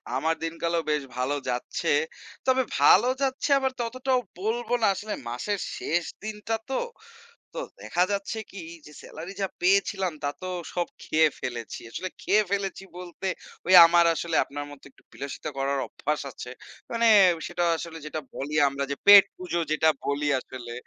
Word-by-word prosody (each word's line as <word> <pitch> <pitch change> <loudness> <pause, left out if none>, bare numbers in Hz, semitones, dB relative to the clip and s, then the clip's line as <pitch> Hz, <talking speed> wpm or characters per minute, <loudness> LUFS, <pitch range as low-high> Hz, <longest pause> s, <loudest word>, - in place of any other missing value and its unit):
আমার 160 +5 +1
দিনকালও 165 +1 -1
বেশ 150 -2 +1
ভালো 130 +3 0
যাচ্ছে। 125 0 -2 0.6
তবে 260 0 +3 0.2
ভালো 245 - +6
যাচ্ছে 270 +2 0
আবার 265 -1 0
ততটাও 255 +2 0 0.2
বলব 225 +4 -2
না। - - +4
আসলে 210 +1 -5 0.2
মাসের 195 - -2 0.2
শেষ 170 +2 0 0.2
দিনটা 215 +1 -3
তো। 265 - 0 0.8
তো - - -5 0.2
দেখা 175 - 0
যাচ্ছে 200 +2 -3
কি 200 - -10 0.3
যে, 150 - -12
সেলারি 165 +5 -8
যা 195 - 0
পেয়েছিলাম 190 0 +2
তা - - +2
তো 185 - -4 0.3
সব 175 -1 0 0.2
খেয়ে 155 0 +3
ফেলেছি। 120 -2 -5
আসলে 185 +9 -4
খেয়ে 215 +1 +4
ফেলেছি 195 -1 -2
বলতে 180 +1 -7 0.4
ওই 185 - +4
আমার 170 +1 +5
আসলে 165 +1 -2
আপনার 145 +1 -6
মতো 145 -1 -13
একটু - - -26
বিলাসিতা 140 +2 -6
করার 140 +1 0
অভ্যাস 150 +1 -2
আছে। 125 - -9 0.4
মানে 235 0 +1 0.4
সেটা 175 0 -1
আসলে 165 0 -7
যেটা 155 +1 -4
বলি 145 +3 -5
আমরা 140 0 -3
যে 140 - -2
পেট 205 -1 +11
পুজো 175 -1 -2
যেটা 160 +1 +3 0.2
বলি 145 +1 -1
আসলে। 125 -2 -8
175 Hz, 160 wpm, -26 LUFS, 145-205 Hz, 0.8 s, পেট